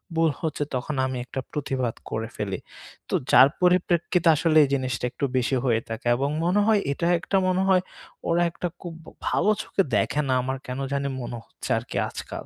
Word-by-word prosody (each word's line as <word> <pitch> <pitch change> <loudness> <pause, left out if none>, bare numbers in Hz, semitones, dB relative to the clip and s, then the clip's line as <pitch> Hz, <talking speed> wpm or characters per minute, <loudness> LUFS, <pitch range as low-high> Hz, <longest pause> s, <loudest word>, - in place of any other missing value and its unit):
ভুল 165 0 +3
হচ্ছে, 155 -2 -1
তখন 130 +4 -3
আমি 130 -1 -3
একটা 130 - -5
প্রুতিবাদ 130 -5 -2
করে 110 +1 -3
ফেলি। 100 -3 -3 0.5
তো - - -5 0.2
যার 130 - +9
পরিপ্রেক্ষিতে 180 -1 +2
আসলে 155 +1 +2
এই 140 - 0
জিনিসটা 130 -3 -1
একটু 140 - -2
বেশি 130 +2 +1
হয়ে 115 -3 +3
থাকে 115 +1 -5
এবং 135 +3 0 0.2
মনে 180 +4 +3
হয় 220 -2 +5
এটা 170 +4 -1
একটা 195 +3 0
মনে 185 0 +2
হয় 185 -1 +5 0.5
ওরা 170 +1 +3
একটা 175 - -3
খুব 170 -2 -7 0.3
ভালো 210 - +2
চোখে 195 - 0
দেখে 150 - +1
না 130 - +2
আমার 130 +1 -3
কেন 125 +1 -4
জানি 140 0 -1
মনে 120 0 -5
হচ্ছে - - -9
আরকি - - -5
আজকাল। - - -7
140 Hz, 190 wpm, -25 LUFS, 125-175 Hz, 0.5 s, যার